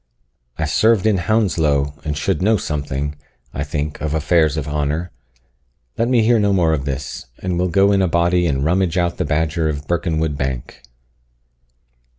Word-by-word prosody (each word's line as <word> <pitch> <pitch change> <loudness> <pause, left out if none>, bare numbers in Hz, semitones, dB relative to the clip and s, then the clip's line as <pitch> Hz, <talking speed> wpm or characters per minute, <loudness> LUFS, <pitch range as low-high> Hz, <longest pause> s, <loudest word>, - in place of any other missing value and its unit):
I - - -1
served 110 -3 +3
in 105 -3 +3
Hounslow, 80 -9 +1
and 75 -2 -3
should 95 +4 -1
know 110 +3 +3
something, 75 -3 -3 0.4
I 70 - -2
think, 75 +1 -4
of 75 0 -1
affairs 80 -1 +2
of 75 - -3
honour. 75 +4 -2 0.8
Let 115 - 0
me 120 -3 +3
hear 115 +1 +4
no 100 -1 +2
more 85 -4 +3
of 70 -3 -2
this, 70 -3 -5
and 90 -2 -2
we'll 90 0 +1
go 100 +4 +4
in 100 -1 +3
a 95 - +2
body 85 +1 +2
and 70 -2 0
rummage 90 +1 +1
out 85 -1 0
the 90 - -1
badger 80 +1 0
in 75 - -2
Birkenwood 80 -1 -1
bank." 65 -3 -4
80 Hz, 170 wpm, -19 LUFS, 75-95 Hz, 0.8 s, hear